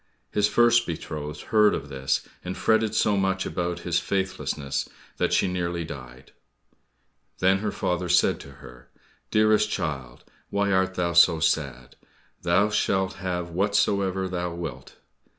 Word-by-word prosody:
His 105 Hz, 0 st, +2 dB
first 120 Hz, 0 st, +4 dB
betrothed 75 Hz, -3 st, -5 dB
heard 105 Hz, -1 st, +5 dB
of 70 Hz, -, -6 dB
this, 65 Hz, -1 st, -1 dB, 0.2 s
and 90 Hz, +1 st, -5 dB
fretted 110 Hz, -1 st, +2 dB
so 105 Hz, -1 st, +3 dB
much 95 Hz, -1 st, 0 dB
about 85 Hz, 0 st, -3 dB
his 85 Hz, 0 st, 0 dB
faithlessness 85 Hz, -7 st, -2 dB, 0.3 s
that -, -, 0 dB
she -, -, +3 dB
nearly 85 Hz, -2 st, -2 dB
died. 65 Hz, -3 st, -10 dB, 1.1 s
Then 95 Hz, +1 st, +3 dB
her 105 Hz, 0 st, -2 dB
father 90 Hz, 0 st, -2 dB
said 90 Hz, -, +3 dB
to -, -, -11 dB
her, -, -, -14 dB, 0.4 s
"Dearest 110 Hz, 0 st, +3 dB
child, 65 Hz, -, -4 dB, 0.3 s
why 100 Hz, 0 st, 0 dB
art 95 Hz, 0 st, +1 dB
thou 85 Hz, -1 st, 0 dB
so 85 Hz, -1 st, +6 dB
sad? 70 Hz, -6 st, -1 dB, 0.4 s
Thou 90 Hz, +5 st, +3 dB
shalt 95 Hz, -2 st, 0 dB
have 90 Hz, -2 st, -3 dB
whatsoever 100 Hz, 0 st, +1 dB
thou 90 Hz, -2 st, -3 dB
wilt." 70 Hz, -7 st, -7 dB
90 Hz, 140 wpm, -25 LUFS, 80-100 Hz, 1.1 s, so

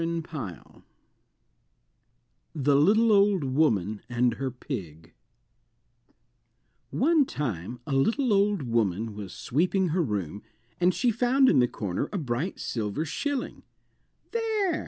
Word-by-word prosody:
THE 145 Hz, -1 st, +2 dB
LITTLE 215 Hz, +11 st, +4 dB
OLD 200 Hz, -4 st, +4 dB
WOMAN 110 Hz, -, +1 dB
AND 120 Hz, 0 st, +2 dB
HER 130 Hz, +4 st, -3 dB
PIG 90 Hz, -, -7 dB, 1.8 s
One 310 Hz, -, +3 dB
time 120 Hz, -, -4 dB
a -, -, -6 dB
little 225 Hz, -, +2 dB
old 200 Hz, -4 st, +2 dB
woman 110 Hz, -3 st, 0 dB
was 100 Hz, -3 st, -7 dB
sweeping 180 Hz, +6 st, 0 dB
her 175 Hz, +3 st, +1 dB
room, 100 Hz, -, -3 dB, 0.4 s
and 180 Hz, +1 st, +4 dB
she 245 Hz, +5 st, +1 dB
found 255 Hz, +4 st, +3 dB
in 140 Hz, -, +4 dB
the 125 Hz, -, +4 dB
corner 95 Hz, -6 st, -3 dB
a 205 Hz, -, -2 dB
bright 140 Hz, +3 st, -3 dB
silver 110 Hz, +6 st, -3 dB
shilling. 280 Hz, -, -3 dB, 0.7 s
"There!" 465 Hz, -, -1 dB
140 Hz, 115 wpm, -27 LUFS, -, 1.8 s, LITTLE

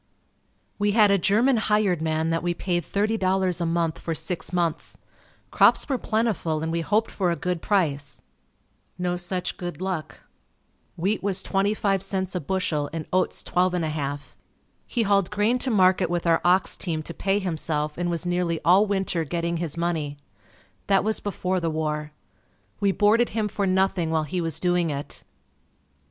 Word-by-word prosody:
We 205 Hz, 0 st, +2 dB
had 210 Hz, -2 st, +5 dB
a 200 Hz, -, +4 dB
German 225 Hz, +8 st, +3 dB
hired 210 Hz, -6 st, +1 dB
man 160 Hz, 0 st, 0 dB
that 165 Hz, -, 0 dB
we 175 Hz, 0 st, -1 dB
paid 175 Hz, -1 st, -1 dB
$30 190 Hz, -4 st, 0 dB
a -, -, +1 dB
month 165 Hz, -4 st, 0 dB
for 165 Hz, -, -3 dB
six 165 Hz, +3 st, -3 dB
months. 170 Hz, -3 st, -2 dB, 0.5 s
Crops -, -, +4 dB
were 270 Hz, -4 st, -1 dB
plentiful 210 Hz, -10 st, -1 dB
and 160 Hz, -, -2 dB
we 165 Hz, 0 st, -1 dB
hoped 215 Hz, +6 st, +1 dB
for 185 Hz, -3 st, 0 dB
a 170 Hz, -, +1 dB
good 180 Hz, -1 st, -3 dB
price. 145 Hz, -9 st, 0 dB, 0.8 s
No 180 Hz, 0 st, -1 dB
such 180 Hz, +1 st, -3 dB
good 175 Hz, -1 st, -6 dB
luck. 185 Hz, -5 st, -4 dB, 0.8 s
Wheat 195 Hz, +6 st, 0 dB
was 195 Hz, -1 st, -1 dB
25c 195 Hz, -1 st, 0 dB
a -, -, +1 dB
bushel 155 Hz, -3 st, -1 dB
and 160 Hz, -1 st, -4 dB
oats 185 Hz, 0 st, 0 dB
12 180 Hz, 0 st, +1 dB
1/2. 150 Hz, -4 st, -3 dB, 0.5 s
He 235 Hz, -, 0 dB
hauled 200 Hz, -3 st, +2 dB
grain 210 Hz, +4 st, +1 dB
to 260 Hz, -, 0 dB
market 185 Hz, -4 st, +3 dB
with 175 Hz, 0 st, -1 dB
our 165 Hz, -1 st, +3 dB
ox 180 Hz, +2 st, +3 dB
team 160 Hz, -4 st, -3 dB
to 170 Hz, -, -7 dB
pay 195 Hz, +2 st, 0 dB
himself 155 Hz, -5 st, -2 dB
and 175 Hz, 0 st, -2 dB
was 170 Hz, 0 st, -2 dB
nearly 175 Hz, -2 st, 0 dB
all 190 Hz, +5 st, +5 dB
winter 190 Hz, -4 st, 0 dB
getting 170 Hz, +2 st, -2 dB
his 165 Hz, -2 st, -4 dB
money. 160 Hz, -4 st, -2 dB, 0.7 s
That 195 Hz, -1 st, +3 dB
was 220 Hz, 0 st, 0 dB
before 185 Hz, -2 st, -2 dB
the 165 Hz, -1 st, -1 dB
war. 150 Hz, -1 st, -2 dB, 0.7 s
We 200 Hz, -1 st, +2 dB
boarded 220 Hz, +4 st, +3 dB
him 215 Hz, -1 st, +1 dB
for 205 Hz, -1 st, -2 dB
nothing 190 Hz, -2 st, +1 dB
while 160 Hz, -1 st, +1 dB
he 175 Hz, +4 st, -3 dB
was 165 Hz, -3 st, -2 dB
doing 175 Hz, -2 st, +1 dB
it. 140 Hz, 0 st, -5 dB
180 Hz, 170 wpm, -25 LUFS, 165-195 Hz, 0.8 s, had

